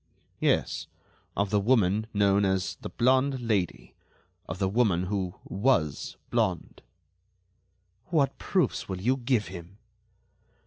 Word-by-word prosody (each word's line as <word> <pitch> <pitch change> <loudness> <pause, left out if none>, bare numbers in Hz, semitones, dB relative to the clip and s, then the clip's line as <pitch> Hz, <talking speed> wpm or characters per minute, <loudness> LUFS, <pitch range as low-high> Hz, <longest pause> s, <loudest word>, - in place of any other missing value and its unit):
"Yes, - - +1 0.5
of 100 0 0
the 105 - +3
woman 105 -1 +2
known 100 -1 +3
as 95 -1 0
the - - -5
blonde 130 +2 +2
Lady, 105 -7 -1 0.6
of - - -4
the 95 0 +1
woman 100 -4 +2
who 95 -1 -2
was 95 - 0
blonde." - - -1 1.3
"What 150 -5 +1
proofs - - 0
will 95 -1 -3
you 125 +7 +2
give 125 -4 0
him?" 90 +1 -10
100 Hz, 120 wpm, -28 LUFS, 95-125 Hz, 1.3 s, the